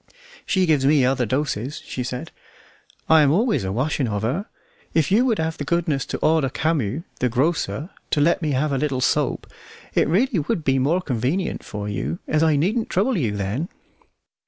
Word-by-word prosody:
"She 190 -1 +2
gives 155 -5 +2
me 140 -1 +4
other 130 -2 +1
doses," 130 0 -2
she 125 - -4
said: 125 0 -5 0.8
"I 160 -1 +6
am 145 - +4
always 195 - +2
a 95 - -2
washing 130 +4 0
of 105 -1 -2
her. 150 - -1 0.5
If 160 +2 +2
you 230 +6 +4
would 230 -4 +2
have 160 0 -2
the - - -2
goodness 160 -3 0
to - - -3
order 155 -4 +3
Camus, 150 -2 -1 0.2
the 125 - +1
grocer, 155 - -1 0.2
to - - +1
let 170 +5 +3
me 155 -3 0
have 145 +3 0
a 135 - 0
little 140 -3 -1
soap, - - +1 0.5
it - - +2
would 210 +11 +3
really 175 +4 +1
be 135 -3 +1
more 160 +8 +2
convenient 135 - -1
for 105 -1 -6
you, 85 -6 -3
as 155 - +1
I 160 -2 +4
needn't 210 - 0
trouble 215 +8 +1
you 115 - -1
then." 105 - -2
150 Hz, 190 wpm, -22 LUFS, 125-165 Hz, 0.8 s, I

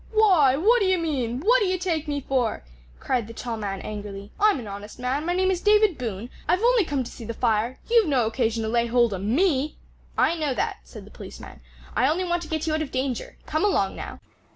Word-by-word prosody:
"Why, 360 -12 +5
what 450 +10 +4
d'ye 375 -1 +3
mean? 265 -7 -2
what 485 +8 +4
d'ye 370 -2 +1
take 335 -4 -2
me 285 -1 -2
for?" 255 -4 -1 0.4
cried 245 -5 -1
the 230 - -10
tall 235 0 -4
man 200 -3 -4
angrily; 205 -1 -7
"I'm 415 -7 +4
an 235 - -7
honest 205 +1 -8
man; 260 +5 -2
my 350 - +1
name 375 +1 +2
is 365 -2 -1
David 420 -3 +4
Boone; 230 -1 -5 0.2
I've 360 +6 +2
only 485 -3 +5
come 280 -4 -1
to - - -9
see - - -10
the 230 +1 -5
fire; 230 +2 0
you've 460 -4 +4
no 260 -6 +2
occasion 225 0 0
to 220 - -2
lay 235 +1 +1
hold 235 -2 +3
o' 190 - -3
me!" 280 - +1 0.4
"I - - +3
know 300 -5 -1
that," 425 - -1
said - - -11
the - - -15
policeman; - - -11 0.3
"I 260 - +3
only 345 +5 0
want 345 -1 -1
to 335 - -7
get 315 0 -2
you 315 - 0
out 310 - 0
of 305 - -3
danger. 260 -2 -3
Come 310 +4 -1
along 410 - +1
now." - - -7
275 Hz, 230 wpm, -25 LUFS, 230-360 Hz, 0.4 s, Why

